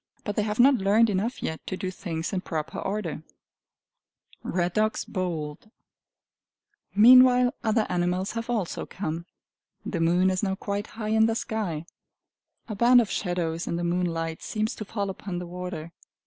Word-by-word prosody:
But 205 - -3
they - - +2
have 210 +1 -2
not 265 +2 +7
learned 210 +3 +4
enough 205 +6 -2
yet 160 - -3
to 185 - -3
do 185 -1 -3
things 165 -1 -4
in 185 - 0
proper 160 -4 -4
order. 195 -7 -3 1.2
Red 175 -1 -1
Dogs 215 0 0
Bold, 165 -6 -3
Fearing 215 - -28
Nobody 205 - -10 0.3
Meanwhile 250 0 +2
other 220 -1 +2
animals 180 +2 0
have 230 +1 -5
also 215 -8 -2
come. 170 -2 -4 0.6
The 170 - -3
moon 175 +3 +3
is 185 - -1
now 190 -2 0
quite 200 +2 -3
high 215 -2 -3
in 220 0 +4
the 225 - 0
sky. 205 -10 -3 0.8
A 220 - -4
band 240 +4 +6
of 220 -5 0
shadows 170 -2 -2
in - - -1
the 175 - -2
moonlight 170 -2 -1
seems 215 +2 -2
to 215 - -5
fall 200 -1 -3
upon 190 -1 -6
the 180 - -4
water. 175 -2 -6
190 Hz, 170 wpm, -26 LUFS, 175-215 Hz, 1.2 s, not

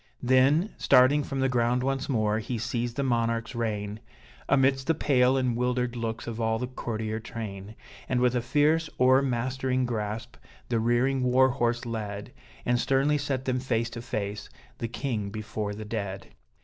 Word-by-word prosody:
Then, 135 - +3
starting 130 +4 +5
from 135 -1 -3
the 135 - +3
ground 125 0 +1
once 135 +1 -1
more, 110 -4 +1
he 115 +2 -3
seized 120 0 -2
the 140 - -1
monarch's 115 -2 0
rein, 105 -3 -3 0.5
Amidst 135 0 +3
the 165 - +3
pale 130 -3 +3
and 125 -3 +1
wildered 125 0 0
looks 115 -1 -3
of 115 -1 -5
all 110 0 +1
the 125 - -2
courtier 110 -3 -4
train; 110 -3 -7 0.3
And 125 - +1
with 125 0 +3
a 120 - +1
fierce, 150 +6 +2
o'ermastering 130 0 +2
grasp, 110 -2 -4 0.3
the 115 - +1
rearing 120 +4 +2
war 130 +1 +4
horse 120 -1 0
led, 105 -3 -5 0.3
And 120 0 +2
sternly 140 +4 +2
set 135 -2 -2
them 130 -1 0
face 115 -2 -1
to 115 - -6
face 105 -3 -4 0.3
the 115 - -2
king 115 -4 -3
before 105 0 -4
the 110 +1 -7
dead! 100 -3 -4
120 Hz, 165 wpm, -27 LUFS, 110-130 Hz, 0.5 s, starting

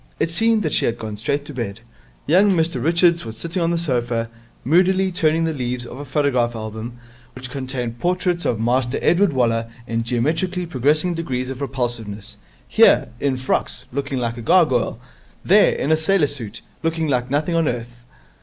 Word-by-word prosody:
It 165 - 0
seemed 225 +4 +2
that 155 - -1
she - - +3
had 115 - 0
gone 110 -1 -6
straight 140 +7 -2
to 145 - -8
bed. 115 -4 -5 0.4
Young 190 +6 +4
Mr 165 -1 0
Richards 170 +1 +3
was 110 -1 -7
sitting 170 +8 -3
on 165 - +2
the 170 - 0
sofa, 120 -7 0 0.3
moodily 185 +5 +3
turning 165 -2 +2
the 165 -1 0
leaves 125 -3 -3
of 120 +2 -9
a 145 - -6
photograph 130 -4 +1
album, 110 +2 -6 0.4
which 130 -1 -8
contained 130 -4 -4
portraits 180 +1 0
of 115 - 0
Master 125 +2 +1
Edward 180 +2 +3
Waller 115 -3 0 0.2
in 115 -1 -2
geometrically 160 +10 -1
progressing 155 +4 +1
degrees 130 -6 -3
of 135 +1 -7
repulsiveness 120 -7 -4 0.3
here, - - +5
in 135 -1 0
frocks, 130 0 -1
looking 140 0 -2
like 120 -1 -2
a - - -6
gargoyle; - - +2 0.5
there, - - +6
in 160 +3 +1
sailor 160 +1 +2
suit, 115 -7 -5 0.2
looking 165 -1 -1
like 125 -3 0
nothing 150 +5 0
on 165 -2 +2
earth. 120 0 -5
135 Hz, 175 wpm, -21 LUFS, 120-165 Hz, 0.5 s, there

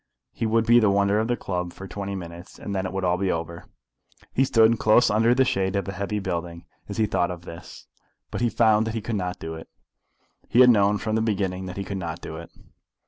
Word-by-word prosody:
He 115 - -2
would 115 +1 +2
be 120 +1 +6
the 110 -3 +3
wonder 100 +1 +2
of 110 - 0
the 120 0 0
club 90 -2 -4
for 95 - -9
twenty 100 +1 -5
minutes, 85 -1 -9
and 100 - -6
then 95 -1 -1
it - - -6
would 95 0 -3
all 90 0 +2
be 95 0 0
over. 85 0 -5 0.7
He 135 - +3
stood 115 -3 +4
close 110 +3 +4
under 115 +3 +3
the 130 0 +4
shade 95 -4 0
of 100 -2 -1
a - - -2
heavy 100 +2 -3
building 85 -3 -4 0.2
as 100 - -5
he 110 - +3
thought 95 -4 0
of 90 -1 -7
this, 85 -1 -11 0.5
but - - -4
he 120 - +2
found 110 -1 +3
that 110 - -3
he 115 - -2
could 115 +2 -3
not 90 -2 -3
do 80 - -6
it. 80 0 -10 0.8
He 120 - +5
had 125 -1 +8
known 105 -2 +3
from 110 +1 -3
the 110 - +2
beginning 95 -4 -1
that 90 - -7
he 100 - -2
could 95 0 -5
not 85 -1 -5
do 80 - -8
it. 85 0 -9
100 Hz, 250 wpm, -24 LUFS, 90-110 Hz, 0.8 s, had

